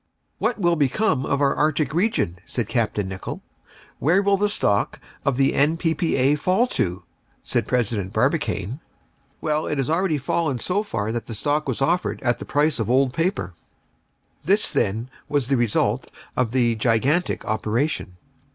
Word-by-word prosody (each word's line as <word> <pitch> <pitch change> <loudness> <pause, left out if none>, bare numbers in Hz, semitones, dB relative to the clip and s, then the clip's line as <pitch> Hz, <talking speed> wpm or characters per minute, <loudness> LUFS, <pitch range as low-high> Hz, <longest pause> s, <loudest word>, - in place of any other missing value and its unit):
"What 230 +2 0
will 175 -4 +2
become 145 - +1
of 140 - 0
our 140 -1 +3
Arctic 150 -1 +1
region?" 175 - 0
said 120 0 -3
Capt. 115 -4 -1
Nicholl." 95 -2 -4 0.6
"Where 180 +7 +3
will 200 0 +4
the 205 +1 +1
stock 105 - +1 0.2
of 140 -3 +1
the 135 0 +3
N.P.P.A. 160 -2 +2
fall 185 +10 +2
to?" 90 - -1 0.4
said - - -1
President 110 -6 0
Barbicane. 120 - 0 0.6
Well, 155 0 0
it 150 - -1
had 135 +2 0
already 170 -2 +1
fallen 145 0 -1
so 185 - 0
far 110 - -3
that 120 0 -4
the 115 - -5
stock 145 +6 0
was 130 +1 -1
offered 175 +5 0
at 120 -2 +1
the - - -7
price 150 -1 +1
of 115 - -1
old 130 0 +3
paper. 165 - -1 0.9
This, 205 +3 +3
then, 110 +6 -1 0.2
was 140 -4 0
the 140 - +3
result 120 0 +1 0.3
of 125 -3 +1
the 120 -1 +2
gigantic 125 +9 +1
operation. 110 - -1
140 Hz, 160 wpm, -23 LUFS, 115-165 Hz, 0.9 s, will